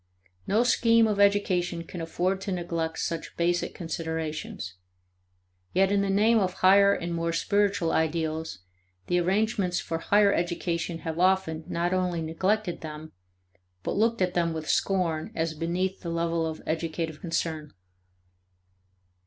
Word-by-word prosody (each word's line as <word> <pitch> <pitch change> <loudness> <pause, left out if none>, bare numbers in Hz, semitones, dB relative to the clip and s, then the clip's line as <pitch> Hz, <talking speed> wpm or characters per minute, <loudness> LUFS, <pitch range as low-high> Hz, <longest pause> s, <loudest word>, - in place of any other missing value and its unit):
No 220 +4 +3
scheme 230 -1 +4
of 210 -2 -1
education 185 -4 +2
can 175 +1 -7
afford 180 +4 -1
to 195 - -4
neglect 170 -2 -2
such 165 -1 -4
basic 175 +1 0
considerations. 160 - -4 1.0
Yet 195 +1 +3
in 200 -1 +3
the 200 - 0
name 215 +4 +4
of 185 -3 0
higher 200 +1 +6
and 170 -3 -2
more 165 0 -1
spiritual 195 +1 +1
ideals, 160 - -1 0.4
the 175 - +1
arrangements 195 0 +1
for 165 - -3
higher 200 +3 +4
education 170 -1 -2
have 160 0 -3
often 180 -4 +2
not 175 +2 -1
only 180 -3 0
neglected 185 +4 -1
them, 155 0 -8 0.7
but - - -2
looked 225 -1 +2
at 180 -1 0
them 170 -2 +1
with 160 -1 -5
scorn 170 -5 0
as 160 0 -1
beneath 175 +4 -2
the 170 - -5
level 165 -1 0
of 160 0 -6
educative 160 -1 -3
concern. 160 -3 -2
175 Hz, 140 wpm, -27 LUFS, 165-195 Hz, 1.0 s, higher